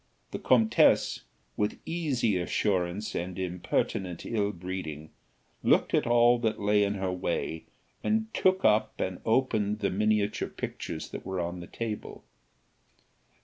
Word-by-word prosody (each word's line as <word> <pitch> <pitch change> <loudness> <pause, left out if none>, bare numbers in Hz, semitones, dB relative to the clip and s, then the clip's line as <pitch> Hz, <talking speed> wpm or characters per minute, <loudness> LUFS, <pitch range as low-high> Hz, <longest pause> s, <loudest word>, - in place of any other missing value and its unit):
The - - -4
comtesse, 115 -4 +3 0.3
with 105 - -1
easy 140 - 0
assurance 95 +2 -1
and 90 +2 -4
impertinent 90 0 -2
ill 105 -3 0
breeding, 85 -5 -6 0.5
looked - - +3
at - - +2
all 120 0 +5
that 110 -2 -1
lay 105 0 +3
in 100 0 0
her 95 -1 -1
way, 90 -2 -2 0.4
and 220 0 +1
took 185 0 +2
up 110 0 +3
and 95 -1 -2
opened 110 -3 +1
the 100 -2 -1
miniature 105 +1 +1
pictures - - -5
that - - -7
were 95 -1 -3
on 85 +1 -3
the 85 - -8
table. 110 -2 -5
105 Hz, 135 wpm, -29 LUFS, 90-115 Hz, 0.5 s, all